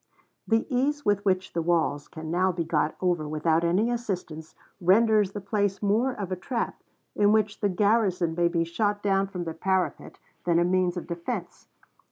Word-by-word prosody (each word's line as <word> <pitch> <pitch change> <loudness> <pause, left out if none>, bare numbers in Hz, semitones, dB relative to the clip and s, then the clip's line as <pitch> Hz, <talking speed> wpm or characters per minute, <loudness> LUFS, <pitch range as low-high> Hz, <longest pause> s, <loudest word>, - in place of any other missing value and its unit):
"The 225 0 +2
ease 285 +2 0
with 205 -1 +2
which 185 -2 0
the 170 - 0
walls 160 -4 0
can 160 0 -7
now 185 +2 +2
be 170 -1 -2
got 155 -1 0
over 175 -4 0
without 160 +2 +1
any 190 +8 +2
assistance 180 -9 -5 0.3
renders 210 +2 +4
the 205 - -4
place 200 0 -1
more 220 +6 +2
of 200 -6 -6
a - - 0
trap, 230 +6 -4 0.3
in 205 0 +4
which 215 -1 +1
the 205 - +1
garrison 195 -3 +2
may 170 +1 +2
be 170 -1 +1
shot 205 +5 -1
down 195 -1 +2
from 180 -2 -5
the 165 -1 -4
parapet, 190 +2 -2 0.3
than 170 -1 +2
a 170 - +4
means 180 0 +1
of 175 - -5
defense. 175 +2 -5
185 Hz, 185 wpm, -26 LUFS, 170-210 Hz, 0.3 s, renders